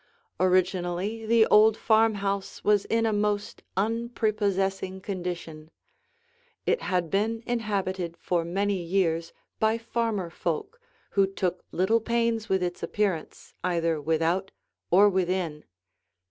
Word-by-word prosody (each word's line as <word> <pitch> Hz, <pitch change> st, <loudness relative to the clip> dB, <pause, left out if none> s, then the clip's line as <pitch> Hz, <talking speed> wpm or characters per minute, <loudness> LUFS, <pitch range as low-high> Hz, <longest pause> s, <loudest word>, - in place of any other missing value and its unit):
Originally 185 Hz, +3 st, +1 dB
the 230 Hz, 0 st, +5 dB
old 215 Hz, +1 st, +5 dB
farmhouse 205 Hz, -3 st, +1 dB
was 205 Hz, -1 st, +3 dB
in 230 Hz, 0 st, +1 dB
a 220 Hz, -, +1 dB
most 205 Hz, 0 st, -1 dB, 0.2 s
unprepossessing 205 Hz, -4 st, 0 dB
condition. 175 Hz, -5 st, -5 dB, 1.0 s
It 480 Hz, -, +1 dB
had 180 Hz, -4 st, -1 dB
been 225 Hz, +3 st, 0 dB
inhabited 190 Hz, -7 st, -2 dB
for 170 Hz, 0 st, 0 dB
many 195 Hz, +3 st, -1 dB
years 170 Hz, -2 st, 0 dB, 0.3 s
by 220 Hz, +1 st, +2 dB
farmer 225 Hz, -6 st, -2 dB
folk 280 Hz, -, -3 dB, 0.3 s
who 195 Hz, -1 st, +3 dB
took 185 Hz, -2 st, -2 dB
little 200 Hz, +6 st, +2 dB
pains 230 Hz, -1 st, 0 dB
with 190 Hz, -1 st, +2 dB
its 175 Hz, 0 st, -3 dB
appearance 195 Hz, -7 st, -2 dB
either 170 Hz, -3 st, 0 dB
without 165 Hz, +5 st, 0 dB, 0.4 s
or 195 Hz, +4 st, +6 dB
within. 180 Hz, -5 st, -1 dB
195 Hz, 115 wpm, -27 LUFS, 180-220 Hz, 1.0 s, or